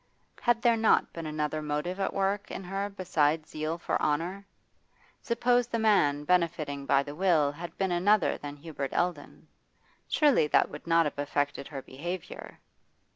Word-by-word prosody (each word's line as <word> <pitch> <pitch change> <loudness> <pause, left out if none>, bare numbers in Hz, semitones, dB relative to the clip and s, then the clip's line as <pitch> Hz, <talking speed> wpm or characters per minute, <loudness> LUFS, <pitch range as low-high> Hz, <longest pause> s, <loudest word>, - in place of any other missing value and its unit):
Had 240 -1 +2
there 235 -2 +4
not 220 0 +3
been 165 -2 -6
another 155 0 -2
motive 150 +5 -3
at 195 - 0
work 195 +1 -1
in - - -6
her 195 +2 -3
besides 160 -5 0
zeal 155 +2 -3
for 175 - -2
honour? 175 +7 -1 0.7
Suppose 245 +1 +2
the 235 - -2
man 175 -10 +3
benefiting 155 -5 0
by 140 0 +4
the 145 0 -7
will 160 -4 +2
had 165 +3 -9
been 190 -2 0
another 190 +3 +3
than 145 0 -7
Hubert 145 -2 -6
Eldon? 175 -4 -2 0.6
Surely 285 - +3
that - - +3
would - - -10
not 165 0 +4
have 145 - -4
affected 145 -1 -1
her 135 -3 -7
behaviour? 175 +6 -7
165 Hz, 160 wpm, -29 LUFS, 150-195 Hz, 0.7 s, there